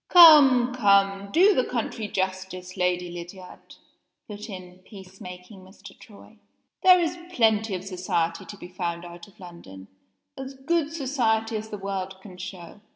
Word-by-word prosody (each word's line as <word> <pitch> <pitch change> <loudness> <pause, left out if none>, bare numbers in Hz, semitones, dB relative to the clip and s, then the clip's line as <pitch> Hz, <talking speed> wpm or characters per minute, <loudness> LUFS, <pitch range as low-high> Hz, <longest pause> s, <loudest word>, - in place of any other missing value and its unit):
"Come! 280 -8 +8
come! 200 -3 +2
Do 385 - +5
the 255 - +1
country 230 -3 -4
justice, 185 -1 -4
Lady 180 -1 -1
Lydiard!" 180 +2 -11 0.5
put 210 +1 -9
in 185 -2 -10
peace 190 0 -15
making 180 +2 -11
Mr. 185 +2 -15
Troy. 215 0 -17 0.4
"There 365 -1 +7
is 345 0 -2
plenty 220 - +1
of 180 - -6
society 180 -3 -2
to 205 - -11
be 175 - -10
found 175 -1 -4
out 175 0 -11
of 200 - -23
London 170 - -12 0.5
as 270 0 -8
good 300 +3 -1
society 235 -7 -1
as 215 0 -5
the 210 - -6
world 195 -1 -5
can 190 -2 -13
show." 185 +1 -10
195 Hz, 155 wpm, -25 LUFS, 180-235 Hz, 0.5 s, Come